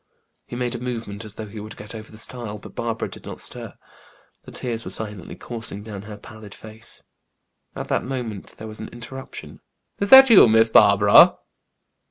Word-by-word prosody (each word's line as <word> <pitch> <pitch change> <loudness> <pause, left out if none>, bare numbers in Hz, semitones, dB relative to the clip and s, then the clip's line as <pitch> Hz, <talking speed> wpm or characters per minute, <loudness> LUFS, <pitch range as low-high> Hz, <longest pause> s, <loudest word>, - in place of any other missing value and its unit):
He - - -7
made 125 0 -2
a 120 - -5
movement 115 -4 -5
as 105 -1 -9
though 110 - -6
he 105 +1 -9
would 110 +1 -9
get 105 +1 -9
over 110 -1 -10
the 110 - -13
stile, 110 -1 -5
but 105 - -13
Barbara 115 -1 -3
did - - -12
not - - -8
stir; - - -7 0.7
the - - -11
tears 115 -2 -5
were - - -7
silently 105 -5 -6
coursing 110 -4 -7
down 105 -3 -8
her 105 0 -10
pallid 110 -1 -12
face. 110 +1 -9 0.7
At - - -6
that - - 0
moment 120 -6 -6
there 110 - -8
was 110 0 -9
an 110 - -6
interruption. 130 +3 -9 0.4
"Is 200 - 0
that 265 -1 +10
you, 200 - +9
Miss 110 +1 +4
Barbara?" - - +7
110 Hz, 190 wpm, -22 LUFS, 105-120 Hz, 0.7 s, that